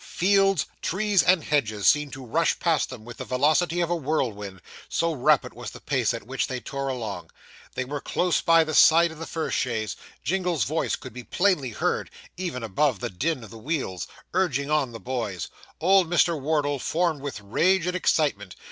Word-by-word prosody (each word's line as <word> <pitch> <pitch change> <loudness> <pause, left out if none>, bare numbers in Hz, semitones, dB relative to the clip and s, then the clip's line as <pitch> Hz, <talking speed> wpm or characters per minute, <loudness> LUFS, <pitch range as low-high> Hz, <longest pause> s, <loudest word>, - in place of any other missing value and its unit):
Fields, 195 -1 +2 0.2
trees, 205 +1 +2
and 180 -3 +3
hedges, 110 -9 0
seemed 150 -1 +4
to 135 -1 -8
rush 160 +8 +1
past 165 -3 +1
them 120 -4 -9
with 120 0 -10
the - - -5
velocity 155 +7 +2
of 170 - 0
a - - +2
whirlwind, 115 - -2 0.3
so 165 0 0
rapid 130 - +2
was - - -7
the - - -11
pace - - 0
at - - -6
which 130 +3 -2
they 130 -1 -4
tore 135 +2 -4
along. 110 -9 -4 0.5
They 130 - -2
were 145 +2 -5
close 180 -1 0
by 165 -1 +5
the 155 0 -4
side 165 +2 +6
of 160 - -11
the 165 - -6
first 160 -1 -2
chaise. 110 -4 -2 0.3
Jingle's 180 -4 0
voice 155 +4 -1
could 130 -5 -10
be 125 0 -8
plainly 180 - +1
heard, 110 - -1 0.3
even 170 -9 -4
above 115 +2 +1
the - - -4
din 135 - -2
of 105 - -11
the 115 - -10
wheels, 130 - -3 0.3
urging 150 -6 0
on 145 -5 +1
the 115 - -8
boys. 115 -9 -4 0.3
Old 185 0 +4
Mr. 170 0 +3
Wardle 145 -1 0
foamed 165 0 0
with 140 -6 -5
rage 170 - +2
and 180 0 -1
excitement. 140 - 0
150 Hz, 190 wpm, -25 LUFS, 125-170 Hz, 0.5 s, side